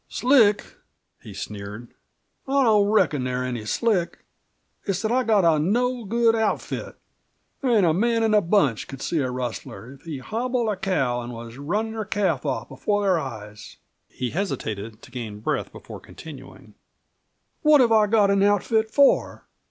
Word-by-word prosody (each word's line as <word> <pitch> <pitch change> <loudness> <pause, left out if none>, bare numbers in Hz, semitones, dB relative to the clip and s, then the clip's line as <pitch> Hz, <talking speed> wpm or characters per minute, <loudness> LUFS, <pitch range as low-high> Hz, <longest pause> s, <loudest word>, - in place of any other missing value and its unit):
"Slick!" 230 -5 +3 0.6
he - - -11
sneered. 105 +3 -8 0.5
"I 275 0 +2
don't 210 -4 +4
reckon 155 -10 +2
they're 125 0 -2
any 120 -4 -4
slick. 180 - -1 0.6
It's 195 +1 -2
that 220 - 0
I've 255 0 +1
got 210 -5 +4
a 160 -2 +4
no 240 +8 0
good 230 +2 +2
outfit. 220 -1 -2 0.7
There 265 - 0
ain't 215 -6 +4
a 160 - +3
man 230 +5 +1
in 220 - +2
the 210 -1 +5
bunch 165 - +1
could 135 - -9
see 165 - -1
a 130 -3 -1
rustler 125 -3 -6
if 135 - -17
he'd 150 -5 -7
hobbled 240 - -2
a 210 - 0
cow 135 -11 -1
and 120 +1 -7
was 115 +1 -9
runnin' 210 +10 -2
her 220 -1 -3
calf 190 - -1
off 120 -3 -2
before 205 0 -1
their 185 -4 +2
eyes!" 105 -7 -9 0.3
He 125 -1 -4
hesitated 110 - -4
to - - -14
gain 115 -4 -6
breath 105 - -2
before - - -10
continuing. - - -12 0.9
"What 300 -1 +6
have 240 -3 +4
I 215 -1 +5
got 205 -2 +3
an 200 0 +2
outfit 205 +2 +2
for? 280 +4 +2
195 Hz, 170 wpm, -24 LUFS, -, 0.9 s, What